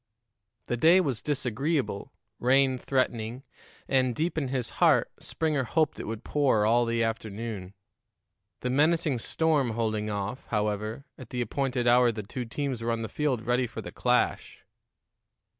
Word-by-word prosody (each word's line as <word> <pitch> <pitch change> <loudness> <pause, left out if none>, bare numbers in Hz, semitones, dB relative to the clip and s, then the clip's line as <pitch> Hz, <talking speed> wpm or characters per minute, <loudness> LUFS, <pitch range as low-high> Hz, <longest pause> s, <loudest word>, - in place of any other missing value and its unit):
The 120 - -2
day 165 +8 +6
was 135 -11 -1
disagreeable, 135 -3 -1 0.3
rain 130 +1 +3
threatening, 125 -2 -1 0.4
and, 130 -3 +2
deep 165 +6 -1
in 150 -4 -1
his 125 -2 -3
heart, - - +4
Springer 155 -4 -1
hoped 155 +4 0
it - - -5
would 110 0 -5
pour 130 -8 +2
all 120 +2 +4
the 115 0 +1
afternoon. 110 -3 -4 0.9
The 125 - -1
menacing 150 -1 +2
storm 145 -2 +1
holding 110 -2 -1
off, 105 +4 -4
however, 105 +4 -2
at 130 -3 -10
the 125 - -2
appointed 125 +1 -1
hour 120 0 +5
the 110 -2 -6
two 125 +5 -5
teams 130 0 -3
were 115 - -2
on 115 0 -2
the 110 - -4
field 130 -3 -1
ready 125 +1 +1
for - - -7
the - - -7
clash. - - 0
125 Hz, 155 wpm, -28 LUFS, 110-140 Hz, 0.9 s, day